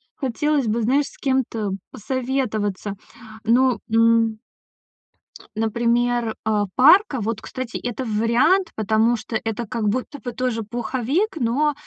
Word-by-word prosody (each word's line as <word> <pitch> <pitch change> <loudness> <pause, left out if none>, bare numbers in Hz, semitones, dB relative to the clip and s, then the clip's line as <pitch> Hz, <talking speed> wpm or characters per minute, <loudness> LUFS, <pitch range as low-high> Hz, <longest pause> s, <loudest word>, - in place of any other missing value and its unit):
хотелось 285 0 0
бы, 230 +2 0
знаешь, 275 +6 +2
с - - -15
кем-то 240 -7 -1 0.2
посоветоваться. 215 -5 -2 0.5
Ну, 250 +2 +3
м 230 -1 +3 1.2
например, 235 +1 +1
а, 210 -1 +1
парка 295 - +5
вот, 220 +1 -2
кстати, 255 -1 -5
это 245 +1 -4
вариант, 235 - +2
потому 220 +2 +2
что 220 +1 -7
это 225 +1 -3
как 220 -2 -2
будто 255 +5 -3
бы 245 -2 -5
тоже 240 -2 -2
пуховик, 260 - -1
но 285 +4 +1
235 Hz, 120 wpm, -22 LUFS, 220-260 Hz, 1.2 s, парка